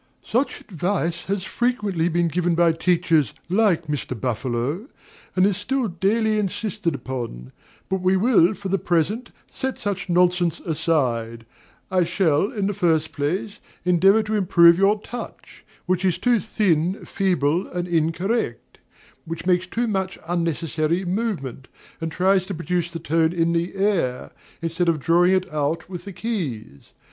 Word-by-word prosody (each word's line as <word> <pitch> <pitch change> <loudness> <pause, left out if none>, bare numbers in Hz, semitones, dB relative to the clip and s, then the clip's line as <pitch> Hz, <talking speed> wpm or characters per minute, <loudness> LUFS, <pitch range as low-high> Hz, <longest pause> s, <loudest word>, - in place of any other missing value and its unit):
Such 250 +5 -1
advice 175 -2 -2
has 195 -1 -2
frequently 205 -8 0
been 170 0 +1
given 175 +1 0
by 170 0 +4
teachers 165 - +2 0.2
like 190 -4 +2
Mr. 140 -5 -4
Buffalo, 130 - -2 0.5
and 185 0 +4
is 200 -2 +1
still 250 +4 -1
daily 215 +5 +1
insisted 185 -7 -3
on; 115 - -5 0.4
but 190 -1 -1
we 185 +1 +3
will, 210 -3 +4
for 195 -1 -6
the 195 +1 +1
present, 180 +9 0 0.2
set 265 -1 -3
such 195 -3 -3
nonsense 175 -1 +2
aside. 125 -8 -1 0.5
I 185 -1 +3
shall, 175 +1 +1
in 205 -6 -2
the 205 - 0
first 165 -5 +1
place, 170 +8 -2 0.3
endeavor 195 +5 +4
to 215 0 -4
improve 175 -4 +5
your 200 +2 +3
touch, 240 +1 -9 0.2
which 185 0 0
is 185 -3 +2
too 245 -2 +2
thin, 190 -4 0
feeble, 180 -3 0
and 175 0 -4
incorrect; 170 - -1 0.5
which 165 +1 -6
makes 180 0 +2
too 235 +6 -1
much 190 -4 -2
unnecessary 170 0 -1
movement, 175 - -3 0.3
and 165 0 -3
tries 185 +2 +2
to 195 - -4
produce 170 +1 -1
the 170 - -6
tone 165 +1 +1
in 170 -1 +1
the 170 +2 -1
air, 190 -11 0 0.3
instead 165 +1 0
of 160 -2 +1
drawing 175 +5 +4
it 185 -4 -2
out 150 +2 -1
with 180 +1 -7
the 200 - -6
keys. 145 - -5
175 Hz, 150 wpm, -23 LUFS, 160-195 Hz, 0.5 s, improve